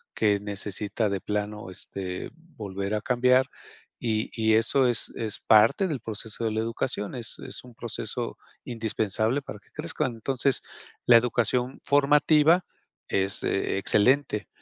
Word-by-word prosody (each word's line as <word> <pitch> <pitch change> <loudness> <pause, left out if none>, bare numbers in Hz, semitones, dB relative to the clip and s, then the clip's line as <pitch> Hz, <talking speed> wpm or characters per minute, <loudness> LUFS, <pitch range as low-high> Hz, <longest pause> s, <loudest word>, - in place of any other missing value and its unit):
qué 105 -2 +2
necesita 105 +1 -2
de 100 -2 -2
plano, 105 -1 -3
este, 90 0 -5 0.3
volver 100 -1 -3
a 105 - -2
cambiar, 125 +3 +3 0.5
y 110 -2 -1
y 110 -1 +2
eso 125 +4 +3
es 120 -2 +1
es 110 -2 -3
parte 115 - +5
del 145 -6 -3
proceso 110 +1 -6
de 110 - 0
la 110 - -1
educación, 115 -2 -3
es 120 -2 -4
es - - -7
un 125 -2 -15
proceso 115 - -4 0.3
indispensable 110 +1 -1
para 105 - -8
que - - -29
crezcan, 150 -5 -2
entonces, 130 +3 0 0.4
la 120 - +8
educación 125 +2 0
formativa 150 +4 +4 0.4
es 95 0 0
excelente, 105 +3 +1
110 Hz, 135 wpm, -26 LUFS, 105-125 Hz, 0.5 s, la